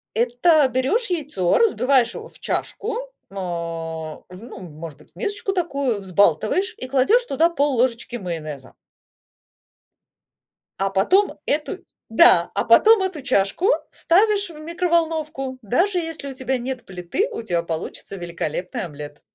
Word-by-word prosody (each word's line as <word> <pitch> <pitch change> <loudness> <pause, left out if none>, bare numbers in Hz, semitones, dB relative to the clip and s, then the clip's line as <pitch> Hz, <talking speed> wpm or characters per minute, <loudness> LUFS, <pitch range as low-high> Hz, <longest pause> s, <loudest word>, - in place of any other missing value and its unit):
Это 250 +6 +3
берешь 260 - 0
яйцо, 285 - +1
разбиваешь 265 - +3
его - - -8
в - - -20
чашку, 445 +3 -3 0.4
мэ, 200 - -14
в 165 -3 -5
ну, 195 +3 -10
может 160 -3 -9
быть, - - -21
в - - -45
мисочку 405 -1 -2
такую, 280 - -1
взбалтываешь 200 - +1
и 255 - -6
кладешь 275 - +3
туда 320 +5 +2
пол-ложечки 260 -5 0
майонеза. 155 - -6 2.0
А 195 - +1
потом 365 - +2
эту 295 +1 -1
и, - - -15 0.2
да, 180 -6 +5
а - - 0
потом 425 - +6
эту 375 -6 -3
чашку 230 - +1 0.2
ставишь 405 +2 +2
в 320 - -12
микроволновку. 320 -5 -1
Даже 350 - +1
если 325 -4 -4
у 270 - -6
тебя 260 0 -1
нет 250 0 -5
плиты, 185 - -2
у - - -5
тя 175 -6 -1
получится 170 +4 -5
великолепный 175 0 -4
омлет. 145 -2 -9
255 Hz, 135 wpm, -22 LUFS, -, 2.0 s, потом